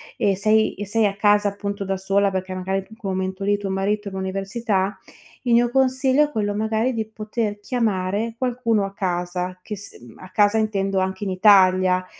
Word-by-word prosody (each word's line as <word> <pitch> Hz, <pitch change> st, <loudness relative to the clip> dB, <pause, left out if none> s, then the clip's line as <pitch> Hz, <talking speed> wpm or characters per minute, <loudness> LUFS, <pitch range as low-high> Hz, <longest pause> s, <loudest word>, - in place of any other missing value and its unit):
e 195 Hz, -2 st, +1 dB
sei 215 Hz, +2 st, +3 dB
e 205 Hz, -, -5 dB
sei 215 Hz, +2 st, +1 dB
a 200 Hz, 0 st, -1 dB
casa 205 Hz, 0 st, +3 dB
appunto 200 Hz, 0 st, -4 dB
da 195 Hz, 0 st, -2 dB
sola, 195 Hz, +1 st, +1 dB
perché 185 Hz, 0 st, -3 dB
magari 185 Hz, +1 st, -2 dB
in 220 Hz, -, -13 dB
quel 205 Hz, -5 st, -5 dB
momento 190 Hz, +1 st, -3 dB
lì 205 Hz, +1 st, +2 dB
tuo 200 Hz, -1 st, -5 dB
marito 205 Hz, +2 st, -1 dB
è -, -, -5 dB
all'università, 195 Hz, +1 st, -2 dB, 0.5 s
il 240 Hz, -, +2 dB
mio 240 Hz, 0 st, +4 dB
consiglio 265 Hz, +2 st, +3 dB
è -, -, -7 dB
quello 205 Hz, -4 st, -1 dB
magari 220 Hz, +4 st, 0 dB
di 220 Hz, -2 st, -3 dB
poter 215 Hz, -1 st, -3 dB
chiamare 215 Hz, -1 st, -1 dB
qualcuno 235 Hz, -5 st, 0 dB
a 195 Hz, -, -7 dB
casa 180 Hz, -1 st, -3 dB
che 210 Hz, -, -5 dB
s 200 Hz, 0 st, -10 dB
ehm, 120 Hz, -1 st, -14 dB
a 185 Hz, -, -11 dB
casa 210 Hz, +2 st, +3 dB
intendo 195 Hz, -3 st, 0 dB
anche 190 Hz, +2 st, -2 dB
in 190 Hz, -, -2 dB
Italia. 185 Hz, -2 st, +4 dB
200 Hz, 195 wpm, -22 LUFS, 190-220 Hz, 0.5 s, mio